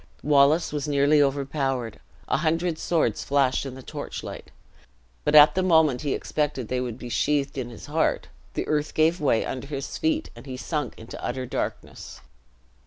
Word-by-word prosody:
Wallace 145 +3 +4
was 150 0 -2
nearly 145 +1 +4
overpowered; 135 -4 -1 0.3
a - - +1
hundred 165 +1 0
swords 170 -2 0
flashed 140 -1 +1
in 130 - -7
the 130 - -10
torchlight; - - -7 0.7
but 150 - +2
at 150 0 +9
the 185 - +1
moment 160 -8 +3
he 145 -3 -1
expected 140 -6 -2
they 125 0 -1
would 120 -2 -4
be 125 - -8
sheathed 140 +3 0
in 130 -3 -4
his 115 - -10
heart, 160 +2 0 0.3
the - - -2
earth 150 0 -1
gave 160 +2 +2
way 135 -6 +2
under 130 +1 -5
his 140 -2 -5
feet, 320 0 0
and - - -12
he 130 -1 -6
sunk 140 +1 -3
into 110 - -10
utter 130 +1 -3
darkness. - - -5
145 Hz, 175 wpm, -25 LUFS, 130-155 Hz, 0.7 s, at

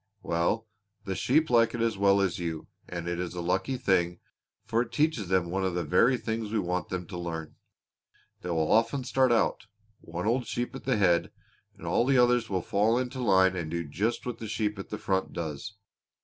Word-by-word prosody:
"Well, 85 +7 0 0.4
the 95 - -2
sheep 150 - +2
like 115 -1 +4
it 115 - -3
as 115 -2 +1
well 100 0 +4
as 95 -3 0
you, 80 -2 -4 0.2
and 85 -1 -5
it 85 0 -2
is 90 0 -4
a - - -4
lucky 95 +9 0
thing, 90 -7 +1 0.5
for 115 - +1
it 120 -1 -4
teaches 135 - +1
them 90 -2 +1
one 95 +1 -1
of 95 -2 -1
the 90 - 0
very 115 - +3
things 110 -2 -3
we 110 - 0
want 90 -2 -1
them 90 -1 -3
to 90 - -7
learn. 80 -2 -5 0.9
They 90 - -6
will 80 -2 +1
often 115 +4 +3
start 130 0 +2
out, 115 - +1 0.3
one 85 +3 -6
old 120 +2 +1
sheep 120 +2 -3
at 135 - -9
the 130 -4 +2
head, 90 -4 +3 0.5
and - - -11
all - - +2
the 135 0 +3
others 125 -1 +3
will 95 -3 -1
fall 110 +4 +2
into 130 +1 -3
line 95 -4 +4
and 85 -4 -3
do 85 +1 -2
just 105 +11 -2
what 125 -2 -4
that 110 - -5
sheep 105 -1 -2
at 95 - -7
the 105 - -4
front 95 -2 -1
does. 80 +4 -5
100 Hz, 215 wpm, -28 LUFS, 90-115 Hz, 0.9 s, like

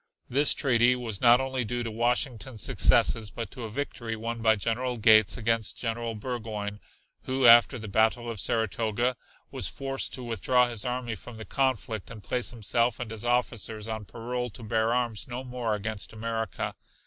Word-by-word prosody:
This 140 +4 +3
treaty 125 -2 +3
was 115 -5 -5
not 120 0 +7
only 130 -1 -1
due 120 +2 -2
to 115 - -4
Washington's 120 0 -1
successes 110 -2 +3
but 115 -1 -6
to 120 - -7
a - - -6
victory 115 -2 -4
won 115 +1 -4
by 110 -1 +5
General 120 +4 -1
Gates 110 -2 +5
against 115 -2 -1
General 115 -1 -3
Burgoyne, 105 -3 -5 0.5
who, 130 0 0
after 120 +2 +8
the 110 -2 -7
battle 110 +4 +2
of 115 -3 -4
Saratoga, 115 +3 0 0.4
was - - -1
forced 135 0 -2
to 130 - -7
withdraw 125 +2 +2
his 115 -4 -2
army 125 -1 -2
from 115 +1 -10
the 110 - -8
conflict 130 -4 -1
and 110 -3 -10
place 120 +8 0
himself 115 +1 0
and 120 -2 -5
his 110 -1 -6
officers 115 -3 0
on 110 -2 -4
parole 125 +3 -4
to 115 +2 -12
bear 110 +1 +1
arms 120 -3 -1
no 125 +1 -5
more 125 -4 -2
against 110 0 -5
America. 110 -4 -3
115 Hz, 175 wpm, -28 LUFS, 110-125 Hz, 0.5 s, after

